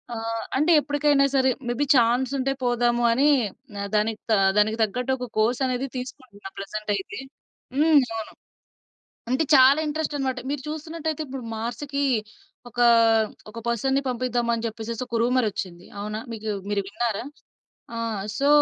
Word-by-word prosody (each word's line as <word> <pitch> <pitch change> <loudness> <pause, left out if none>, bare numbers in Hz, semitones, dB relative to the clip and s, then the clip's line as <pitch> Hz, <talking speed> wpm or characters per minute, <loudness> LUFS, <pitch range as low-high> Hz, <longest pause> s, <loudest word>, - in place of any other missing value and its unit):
ఆహ్, 225 0 -3 0.2
అంటే 320 +4 +3
ఎప్పడికైనా 290 -1 +2
సరే, 260 0 +4 0.2
మేబీ 245 +4 0
చాన్సుంటే, 260 +3 +2
పోదాము 240 0 +2
అని 280 +5 +4 0.5
ఆహ్, 200 - -4
దానికి 215 +1 0
తా 215 - +5 0.2
దానికి 215 +1 +2
తగ్గట్టొక 250 +3 -2
కోర్సనేది 250 +3 +1
తీసుకుంటున్నా 250 -6 -9
ప్రెజెంటయితే. 205 0 -4 0.6
హ్మ్. 300 -1 +6 0.2
అవును. 220 - -6 1.0
అంటే, 260 +5 +2
చాలా 265 +3 +7
ఇంట్రెస్టనమాట. 290 -4 -2
మీరు 290 -2 -4
చూస్తున్నట్టయితే, 315 0 -4
ఇప్పుడు 265 -2 -6
మార్స్‌కీ 275 +5 -3 0.7
ఒకా, 240 +2 +3 0.6
ఒక 220 - -9
పర్సన్‌ని 265 +4 +1
పంపిద్దాం 245 -1 -1
అని 230 - -4
చెప్పేసేసి 225 +1 -5
ఒక 235 -1 -2
రూమరొచ్చింది, 210 -8 -1
అవునా! 210 +1 -4
మీకు 220 -1 -4 0.2
మీరు 200 -1 +1
విన్నారా? 230 +1 -2 0.7
ఆ! - - -3 0.4
సో 280 +1 +2
245 Hz, 125 wpm, -24 LUFS, 225-275 Hz, 1.0 s, చాలా